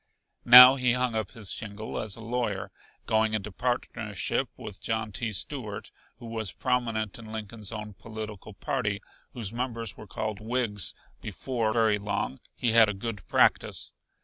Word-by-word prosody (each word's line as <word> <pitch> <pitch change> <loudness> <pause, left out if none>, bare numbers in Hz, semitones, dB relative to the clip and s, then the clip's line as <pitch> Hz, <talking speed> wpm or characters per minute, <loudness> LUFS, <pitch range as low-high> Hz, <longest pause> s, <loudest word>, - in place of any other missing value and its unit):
Now 125 +2 +12
he 125 -2 +2
hung 125 -1 +1
up 110 -3 -2
his 105 -4 -2
shingle 110 -1 -4
as 105 -3 -2
a 115 - -11
lawyer, 115 -3 -2 0.3
going 110 0 +2
into 105 0 -3
partnership 120 +4 -2
with 105 -2 -9
John 110 -1 -2
T. 110 +3 -2
Stuart 105 0 -3 0.3
who 120 - -11
was 110 -4 -2
prominent 115 -5 -1
in 110 -1 -10
Lincoln's 110 -1 -3
own 105 -2 -6
political 110 -1 -8
party, 105 -3 -1 0.3
whose 115 -4 -4
members 115 -2 -3
were 110 - -10
called 105 +1 -4
Whigs. 110 -4 -1 0.3
Before 115 +2 -2
very 110 -2 +3
long 100 -9 -3 0.2
he 120 - +1
had 115 -1 +7
a 105 - -2
good 105 -1 -6
practice. - - +2
110 Hz, 155 wpm, -28 LUFS, 105-120 Hz, 0.3 s, Now